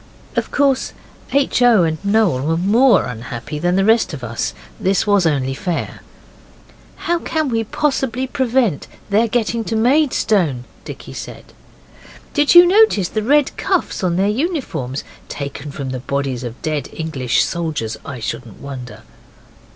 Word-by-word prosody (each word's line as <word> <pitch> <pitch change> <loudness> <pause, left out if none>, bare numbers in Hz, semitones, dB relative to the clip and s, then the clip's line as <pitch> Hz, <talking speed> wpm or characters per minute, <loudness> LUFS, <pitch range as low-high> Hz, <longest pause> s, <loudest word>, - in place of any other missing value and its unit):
Of - - -1
course 275 -2 +1 0.4
H. 275 -2 +2
O. 235 -6 +6
and 160 +1 -2
Noel 200 -9 +2
were 165 0 +1
more 225 +9 +4
unhappy 120 +3 -6
than 175 +3 +1
the 195 0 +2
rest 220 -6 +3
of 130 - -10
us. 115 - -3 0.2
This 190 +2 +1
was 200 -4 +3
only 135 -3 0
fair. 170 +4 -4 0.9
'How 345 0 -1
can 315 -3 -1
we 225 -2 0
possibly 265 0 -1
prevent 255 - 0 0.2
their 220 +3 +3
getting 230 0 -1
to 225 - -2
Maidstone?' 220 - +2 0.2
Dickie - - -9
said. - - -9 0.8
'Did 295 +2 +3
you 350 0 +11
notice 370 - +4
the 215 - -2
red 285 +5 +2
cuffs 375 - -1
on 175 -2 +1
their 190 +2 +2
uniforms? 220 - -2 0.3
Taken 140 0 -6
from 140 -2 -5
the 130 - -4
bodies 135 -1 -3
of 120 0 -7
dead 155 -2 -2
English 140 -7 0
soldiers, 155 -10 -3
I 130 -3 -7
shouldn't 115 -1 -6
wonder. 130 -3 -8
190 Hz, 150 wpm, -19 LUFS, -, 0.9 s, you